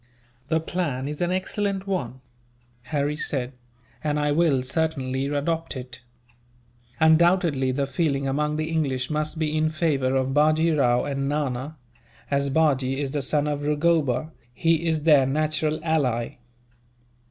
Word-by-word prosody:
"The 160 +1 +1
plan 155 -6 -3
is 150 +2 -5
an 175 0 +1
excellent 195 +1 -2
one," 130 -11 -3 0.6
Harry 145 +1 -1
said, 130 -4 -3 0.5
"and 150 -1 0
I 145 0 +1
will 145 -4 +2
certainly 135 -2 -1
adopt 155 +3 -2
it. 125 -1 -8 1.0
Undoubtedly, 160 -4 +3
the 140 +2 0
feeling 140 -1 -1
among 150 +2 0
the 155 0 -2
English 135 -4 -1
must 155 +1 -2
be 155 -1 -1
in 155 0 +2
favour 150 -5 0
of 130 0 0
Bajee 155 +3 +3
Rao 125 -4 +3
and 140 -1 -2
Nana. 145 0 -2 0.5
As 140 0 +1
Bajee 135 -3 +1
is 140 -2 -2
the 145 0 -1
son 145 +2 0
of 145 -1 -2
Rugoba, 150 -1 +1 0.2
he 165 +3 +1
is 160 -2 0
their 145 -5 +5
natural 155 +2 0
ally. 130 -9 0
150 Hz, 140 wpm, -24 LUFS, 135-160 Hz, 1.0 s, their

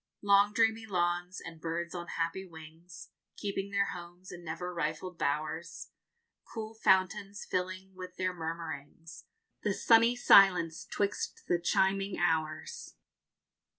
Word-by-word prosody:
Long 200 0 +5
dreamy 225 0 +1
lawns, 175 -1 -1
and 165 -1 -10
birds 170 +1 -3
on 175 -1 -5
happy 165 +3 -1
wings, 165 +2 -12 0.3
Keeping 200 -1 -3
their 200 0 +1
homes 175 +1 -10
in 175 -1 -9
never 170 +2 -5
rifled 165 +2 -3
bowers; 155 +3 -3 0.6
Cool 220 0 -5
fountains 200 0 +1
filling 185 +1 -3
with 185 -1 -9
their 185 0 -1
murmurings 165 -1 -7 0.4
The 205 -2 0
sunny 230 +1 +5
silence 185 -8 +5
'twixt 205 0 -2
the 175 - +2
chiming 195 +2 +1
hours. 160 -2 -2
180 Hz, 120 wpm, -31 LUFS, 165-195 Hz, 0.6 s, Long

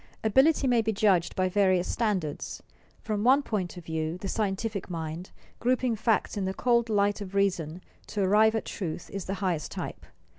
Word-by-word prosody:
_ - - -28 0.2
Ability 265 +7 +4
may 245 -3 +4
be 220 0 0
judged 195 -5 +2
by 185 0 +2
various 185 -1 +2
standards. 190 -10 -2 0.4
From 210 -2 -2
one 270 +4 +5
point 190 -8 -3
of 175 - -9
view, 160 +1 -2
the 195 - -6
scientific 200 0 -2
mind, 165 +1 -5 0.3
grouping 250 -1 +1
facts 220 +1 +1
in 200 -2 -1
the 190 0 -2
cold 235 -2 +2
light 205 0 +1
of 200 -1 -7
reason 180 -4 0 0.2
to 205 - -1
arrive 215 +3 +4
at 220 - -2
truth, 175 -4 -5
is 195 -2 -5
the 195 - -3
highest 170 -5 -1
type. - - -6
200 Hz, 185 wpm, -28 LUFS, 180-220 Hz, 0.4 s, one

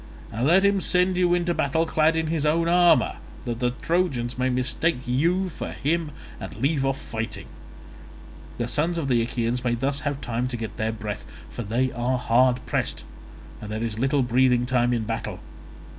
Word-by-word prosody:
And 120 +4 0
let 190 +5 +5
him 200 -1 +3
send 180 +1 +2
you 180 -1 +3
into 175 0 0
battle 160 +1 +1
clad 160 0 +2
in 160 0 0
his 160 -2 -1
own 165 +2 +2
armour, 175 0 +4 0.3
that 120 -1 -3
the 125 -1 +1
Trojans 150 -9 0
may 130 +1 0
mistake 130 +6 0
you 170 +10 +1
for - - -6
him 160 +2 -1 0.3
and - - -7
leave 135 +5 0
off 135 0 0
fighting; 115 0 -5 1.1
the 120 - -2
sons 160 +8 0
of 145 -5 -2
the 120 -2 +3
Achaeans 120 +1 -1
may 120 -1 +1
thus 135 +4 -1
have 145 -1 -3
time 120 -2 -2
to 125 -1 -4
get 110 -1 -6
their 110 0 0
breath, 105 -3 -5 0.3
for - - -5
they 120 +4 0
are 125 +2 -1
hard 125 +1 +2
pressed - - -1 0.6
and 105 - -7
there 110 +1 -3
is 110 -1 -3
little 135 +2 +2
breathing 125 0 +3
time 125 -1 +2
in 120 -2 0
battle. 110 -4 -4
130 Hz, 190 wpm, -25 LUFS, 120-160 Hz, 1.1 s, let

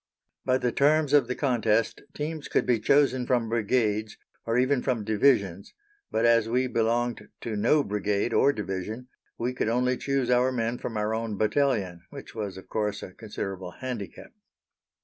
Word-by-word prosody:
By 130 - +3
the 125 -2 0
terms 150 +2 +3
of 140 -5 +5
the 125 - -2
contest 115 -5 +1
teams 155 0 -4
could - - +1
be 120 -3 +2
chosen 135 -1 +3
from 120 -3 +1
Brigades, 110 -1 0 0.3
or 115 +1 +1
even 130 +1 +2
from 120 -5 -1
Divisions, 100 -4 +1 0.3
but, 115 - +1
as 115 -1 +4
we 125 +2 +2
belonged 120 0 0
to 115 -2 -4
no 145 +8 +3
Brigade 105 +1 -1
or 140 - +5
Division, 105 +2 -5 0.3
we 125 +2 -2
could 120 - -1
only 125 +2 +1
choose 135 -3 0
our 125 +1 +3
men 120 -1 -2
from 115 - -4
our 105 +1 0
own 110 -2 -3
battalion, 110 -7 0
which - - -10
was 105 -4 -5
of 95 - -11
course 105 -2 -2
a - - -8
considerable 95 -4 -6
handicap. 125 -6 -7
115 Hz, 170 wpm, -27 LUFS, 105-130 Hz, 0.3 s, of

